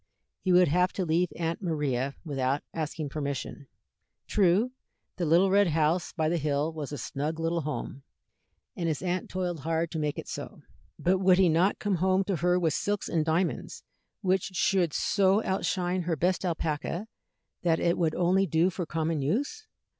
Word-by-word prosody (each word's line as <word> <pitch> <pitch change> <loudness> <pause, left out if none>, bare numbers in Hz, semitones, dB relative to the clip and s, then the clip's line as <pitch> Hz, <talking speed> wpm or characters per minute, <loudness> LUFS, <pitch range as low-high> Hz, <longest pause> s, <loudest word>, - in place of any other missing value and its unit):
He 185 - 0
would 180 0 +6
have 180 +4 +2
to 185 - -2
leave 170 +2 +2
Aunt 165 +1 -2
Maria 140 -6 -1
without 135 -2 -1
asking 155 -1 -3
permission. 140 -1 -4 0.6
True, 205 +5 +3 0.5
the 175 -3 -1
little 175 +5 +4
red 200 0 +5
house 165 +2 +1
by 160 -3 -1
the 170 +1 +1
hill 150 +2 0
was 150 -3 -5
a 145 - -4
snug 150 +5 -3
little 165 +1 0
home, 150 -2 -5 0.7
and 170 - -2
his 155 +1 -2
aunt 180 0 -2
toiled 180 -3 -2
hard 165 +3 -1
to 160 - -3
make 150 -1 -1
it - - -6
so; - - -7 0.3
but 185 +2 +2
would 185 -1 +5
he 185 -2 +5
not 170 +5 +3
come 205 -3 0
home 185 +2 +2
to 195 -2 -1
her 180 +2 +2
with 165 -3 +1
silks 205 0 -1
and 160 -2 +1
diamonds 165 +3 -1 0.4
which 190 -2 +1
should 175 -2 +2
so 200 +6 +2
outshine 185 -1 0
her 170 -1 -1
best 180 +5 0
alpaca 165 +2 -2 0.6
that 165 -2 +2
it 170 0 +2
would 165 -3 0
only 185 +2 +2
do 165 +3 +2
for 175 -1 -4
common 160 -1 -1
use? 285 - -2
170 Hz, 175 wpm, -28 LUFS, 155-185 Hz, 0.7 s, would